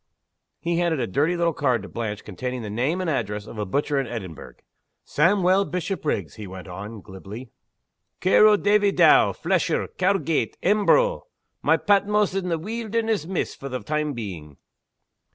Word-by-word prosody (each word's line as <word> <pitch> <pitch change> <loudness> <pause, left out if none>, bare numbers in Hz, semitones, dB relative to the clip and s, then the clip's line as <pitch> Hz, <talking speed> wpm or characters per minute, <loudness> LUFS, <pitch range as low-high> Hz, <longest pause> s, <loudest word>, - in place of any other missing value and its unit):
He 170 0 -1
handed 170 -4 +1
a - - 0
dirty 150 - 0
little 170 -1 +1
card 130 -7 0
to - - -8
Blanche 105 -3 -5
containing 125 +5 -5
the 105 - -5
name 135 - 0
and 185 - -2
address 105 -8 -2
of 110 - -9
a 105 - -2
butcher 145 +6 0
in 135 - -2
Edinburgh. 95 -9 -7 0.5
"Sawmuel 185 +4 +3
Bishopriggs," 170 - -3
he 105 -2 -7
went 95 +1 -9
on, 100 +4 -8
glibly. 105 +6 -10 0.7
"Care 190 +4 +5
o' 210 -1 +5
Davie 205 0 +3
Dow, - - +6
flesher; - - 0
Cowgate; 180 - +1
Embro. 215 - +3 0.3
My - - +3
Patmos 205 0 +2
in 190 -2 -2
the 165 - 0
weelderness, 220 -1 -2
miss, 190 -1 -2
for 140 - -8
the 130 0 -4
time 150 -1 -1
being." 90 - -7
150 Hz, 160 wpm, -24 LUFS, -, 0.7 s, Dow